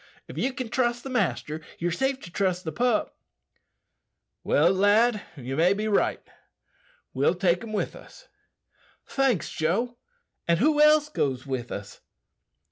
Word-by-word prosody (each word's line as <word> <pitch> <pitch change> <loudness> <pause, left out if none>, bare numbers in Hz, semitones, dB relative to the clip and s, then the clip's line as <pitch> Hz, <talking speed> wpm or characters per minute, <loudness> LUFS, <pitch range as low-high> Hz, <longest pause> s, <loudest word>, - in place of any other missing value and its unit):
If - - -10
ye - - 0
can 255 -3 -5
trust 240 0 0
the 270 - -6
master, 155 - -1 0.2
ye're 175 +1 -1
safe 265 +7 0
to 170 - -10
trust 185 -1 0
the 160 - -4
pup." 240 +1 0 1.3
"Well, 165 +5 +3
lad, 210 +3 +3 0.2
ye 130 0 -5
may 170 +6 +4
be 210 +2 -2
right. 205 - 0 0.9
We'll 140 +7 +2
take 180 +1 +1
him." 215 -2 -5 1.3
"Thanks, 265 - 0
Joe. 225 +10 -1 0.5
And 170 0 +3
who 295 - +3
else 300 0 +6
goes 135 - -2
with 130 -3 -4
us?" 100 -1 -7
200 Hz, 135 wpm, -26 LUFS, 160-245 Hz, 1.3 s, else